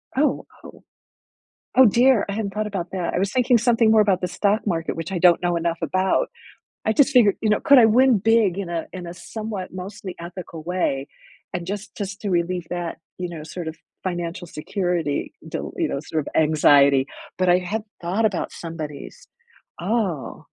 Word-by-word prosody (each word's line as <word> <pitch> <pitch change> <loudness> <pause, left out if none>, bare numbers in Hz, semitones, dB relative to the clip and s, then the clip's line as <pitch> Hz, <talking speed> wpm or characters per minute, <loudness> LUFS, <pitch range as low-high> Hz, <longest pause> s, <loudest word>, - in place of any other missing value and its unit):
Oh 295 +2 +1 0.2
oh - - -13 0.9
oh 260 -1 +8
dear, 240 +2 +4
I 200 - -2
hadn't 200 -2 -3
thought 215 0 -1
about 190 -4 -4
that, 180 -3 -2
I - - +1
was 190 +1 0
thinking 250 -1 +3
something 230 -1 +3
more 220 - +6
about 200 -3 +3
the 180 - -2
stock 205 +5 0
market, 165 -4 -1
which 165 +3 -5
I 185 - -1
don't 175 0 +5
know 175 -1 +1
enough 170 0 -1
about. 190 - +1 0.6
I 220 - +2
just 285 +4 +4
figured, 230 -7 +5
you 220 - +1
know, 210 - +3
could 280 -4 +6
I 240 - +8
win 245 +2 +5
big 215 -3 +3
in 195 -3 -4
a 170 -1 -3
in 185 -1 -6
a 170 - -6
somewhat, 200 +1 -6
mostly 185 0 -7
ethical 170 -2 -8
way? 155 -6 -1 0.5
And 175 -1 -3
just 205 +2 -5
just 200 -1 -5
to 205 - -2
relieve 175 -1 -1
that, 175 -1 -4 0.2
you 180 -1 -4
know, 160 -3 -7
sort 170 +1 -7
of 160 - -5 0.3
financial 175 -1 -4
security, 170 -2 -2
dil - - -5
you - - +1
know, - - -3
sort 155 +1 -2
of - - -3
anxiety, 140 -3 +5 0.3
but 185 0 +2
I 175 - +6
hadn't 210 +5 -4
thought 185 +6 0
about 220 - -1
somebody's 155 -4 -8 0.5
oh. 190 - -2
185 Hz, 190 wpm, -23 LUFS, 170-215 Hz, 0.9 s, oh